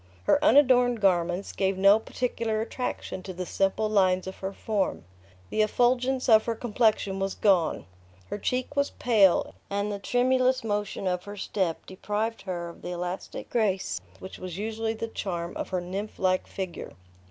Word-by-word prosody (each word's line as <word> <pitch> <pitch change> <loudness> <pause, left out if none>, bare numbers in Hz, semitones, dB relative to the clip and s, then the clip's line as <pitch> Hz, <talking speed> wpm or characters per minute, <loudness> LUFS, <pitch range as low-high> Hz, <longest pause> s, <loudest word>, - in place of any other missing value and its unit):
Her - - +3
unadorned 250 -3 +5
garments 180 -1 +1
gave 190 -1 0
no 195 +3 +6
particular 230 -2 -2
attraction 225 -3 -4
to 185 0 -7
the 180 +1 -4
simple 195 +4 0
lines 185 -3 +2
of 190 - -7
her 190 0 -4
form; 200 - -2 0.5
the 215 - +2
effulgence 250 +4 +2
of 220 -2 +6
her 230 - -1
complexion 215 -4 +1
was 195 0 -2
gone; 185 -6 +2 0.4
her - - -4
cheek 255 +6 -2
was 280 0 +2
pale, 210 -7 +3 0.2
and 200 +1 -1
the 200 - -4
tremulous 255 +3 +2
motion 205 -2 -2
of 180 -1 -1
her 205 0 -8
step 185 -4 -2
deprived 210 +4 -3
her 175 -1 -3
of 170 - -13
the - - -6
elastic 180 +1 -5
grace 205 -5 0 0.2
which 190 - -10
was 180 -2 -6
usually 220 +2 -2
the 230 +1 -4
charm 175 -6 -4
of - - -4
her 185 -1 -1
nymph 195 +4 -5
like 185 -1 +1
figure. 185 -3 -6
205 Hz, 165 wpm, -27 LUFS, 185-225 Hz, 0.5 s, no